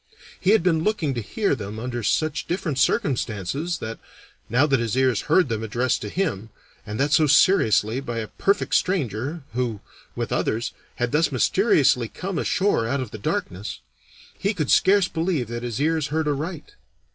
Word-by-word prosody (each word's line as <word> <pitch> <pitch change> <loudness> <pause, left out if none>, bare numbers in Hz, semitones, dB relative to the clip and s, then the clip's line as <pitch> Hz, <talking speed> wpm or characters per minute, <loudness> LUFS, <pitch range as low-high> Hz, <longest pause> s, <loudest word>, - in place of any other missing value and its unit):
He 185 - 0
had 215 -4 +5
been 165 -3 +2
looking 165 -9 0
to 120 - -3
hear 200 - -1
them 105 -4 -5
under 120 +1 -4
such 155 +8 0
different 165 -6 -2
circumstances 135 - 0
that, 110 0 -6 0.5
now 125 +6 +4
that 135 -4 +2
his 115 +1 -1
ears 130 -5 +2
heard 185 - +4
them 110 -3 -2
addressed 120 +3 0
to 105 - -5
him, 115 - -2 0.4
and 105 +1 -5
that 145 +2 +1
so 155 +1 +5
seriously, 130 - +4
by 120 -4 -5
a 110 -1 -3
perfect 200 - 0
stranger, 145 - 0
who, 120 -4 -2 0.4
with - - -3
others, 115 +2 -1 0.2
had 120 0 -1
thus 160 +2 +2
mysteriously 135 - +3
come 185 - -4
ashore 190 - +1
out 140 +4 0
of 130 -5 -5
the 110 - -7
darkness, 100 0 -3 0.6
he 200 +2 -1
could 155 -6 -1
scarce 195 -1 +5
believe 160 - -1
that 120 0 -4
his 120 -1 -4
ears 155 0 +1
heard 155 +1 -1
aright. 155 - -3
135 Hz, 175 wpm, -23 LUFS, 115-165 Hz, 0.6 s, had